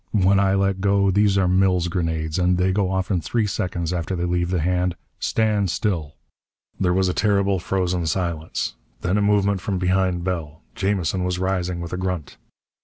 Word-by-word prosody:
When 95 +1 +4
I 100 0 +3
let 95 -1 +1
go 100 -1 +3
these 100 0 +3
are 95 -2 +3
Mills 90 -1 +2
grenades, 80 -2 -2
and 90 0 +2
they 90 +1 +2
go 95 -1 +1
off 95 +1 -1
in 90 -3 +1
three 115 +3 0
seconds 90 -3 -2
after 90 +2 -2
they 90 0 -1
leave 90 0 0
the 90 -1 0
hand. 90 +2 0 0.2
Stand 105 -3 +1
still!" 85 -6 -2 0.6
There 90 -2 +2
was 95 +1 +2
a 90 - 0
terrible, 100 -2 +2
frozen 90 -2 -1
silence. 80 -7 -2 0.3
Then 90 - 0
a 105 - +2
movement 100 -1 +2
from 100 0 -2
behind 90 -1 +1
Bell. 80 -6 -4
Jamison 95 +1 -1
was 90 0 -1
rising 90 -1 -1
with 85 0 -6
a - - -2
grunt. 90 -5 -4
90 Hz, 185 wpm, -22 LUFS, 90-95 Hz, 0.6 s, When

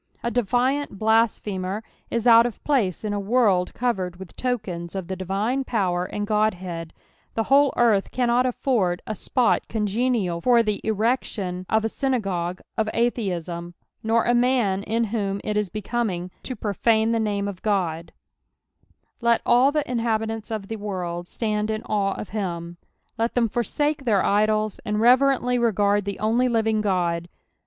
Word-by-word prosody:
^^defiiiit 245 +2 0
blasphemtr 215 -2 +1 0.3
is 235 0 -2
out 235 0 +7
of 240 - -9
place 225 - 0
in 210 -1 -2
a 205 - -1
world 200 -4 +2
covered 190 -8 -1
with 190 -1 -11
tokens 195 -9 -3
of 190 -3 -4
the 190 - -3
divilTB 200 +8 -1
power 180 -6 0
and 205 +2 -4
Godhead: 185 -6 -1 0.4
the 225 - +1
whole 275 +2 +4
earth 220 -5 +3
cannot 245 0 +2
nfford 225 -8 0
a - - -4
epot 240 +4 +1
congenial 210 -4 0
far 240 +1 +4
the 210 -2 -2
erection 210 -4 -1
of 220 0 +2
a - - +3
synagogue 195 -9 -2
of 220 -1 0
Atheism, 175 -7 -2 0.3
nor 225 +1 +2
a 240 - +3
man 240 -6 +2
in 225 +3 0
whom 200 -3 -2
it 210 - -2
is 210 -2 0
becnming 210 -4 -3
to 255 - -5
profane 220 +2 +1
the 230 - +1
name 205 -2 -1
of 195 -3 -6
O^S 170 -6 -1 0.6
" - - -42
Let 235 0 +2
all 250 +4 +5
the 300 -1 -1
inhabitant* 225 -2 -1
of 215 -3 -4
the 225 - -4
world 180 -4 -4
itand 215 0 -2
in 215 0 -2
aire 195 -2 0
of - - -7
Mm." 175 -5 -4 0.4
Let 230 +1 0
them 240 -2 +3
forsflfcr! 275 +5 -1
heir 205 -4 +3
idols, 215 0 +1
and 210 0 -1
reverently 250 +1 +4
regard 205 -3 +2
the 200 -1 -3
only 230 +4 +2
living 220 -2 +1
God. 175 -4 0
215 Hz, 160 wpm, -24 LUFS, 190-235 Hz, 0.6 s, out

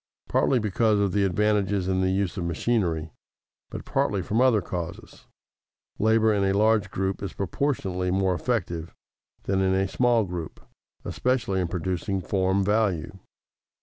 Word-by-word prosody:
Partly 135 - +2
because 110 -1 +1
of 100 -2 +1
the 100 +1 +1
advantages 100 0 +1
in 95 0 +1
the 95 - +2
use 95 -1 -1
of 90 - -3
machinery, 85 -2 -1 0.6
but - - -7
partly 100 -3 0
from 110 +8 0
other 130 -4 +4
causes, 85 -3 -7 0.7
labor 110 0 +3
in 100 -1 +1
a 95 0 +2
large 105 -2 +3
group 95 0 -2
is 100 -3 -5
proportionately 95 -5 -2
more 95 0 +1
effective 85 -4 -2 0.5
than 95 0 0
in 95 0 +2
a 95 0 +1
small 115 +5 +2
group, 90 -4 -6 0.5
especially 120 -7 0
in 90 - -1
producing 95 +3 -2
form 95 +1 0
value. 95 -4 0
95 Hz, 150 wpm, -25 LUFS, 90-105 Hz, 0.7 s, other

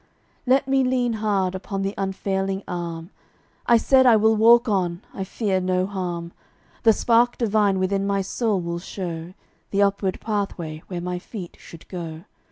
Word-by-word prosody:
Let 265 +2 +3
me 270 0 +3
lean 250 -2 +1
hard 205 -4 0
upon 195 +1 -4
the 195 +1 -2
unfailing 195 0 -2
Arm. 170 0 -5 0.6
I 235 - +6
said 260 +2 +4
I 235 - +7
will 220 +1 +4
walk 235 +3 +6
on, 180 -3 0
I 195 - -4
fear 190 -1 -1
no 185 0 +1
harm, 175 -3 -4 0.5
The 225 - +6
spark 235 +2 +3
divine 210 -4 +2
within 195 +1 0
my 200 -1 0
soul 215 0 0
will 170 -1 -3
show 175 -1 -6 0.3
The 200 0 +2
upward 200 -1 0
pathway 185 -7 -3
where 180 -2 -5
my 180 0 -3
feet 185 -2 -8
should 165 - -13
go. 165 -3 -7
195 Hz, 165 wpm, -23 LUFS, 180-220 Hz, 0.6 s, I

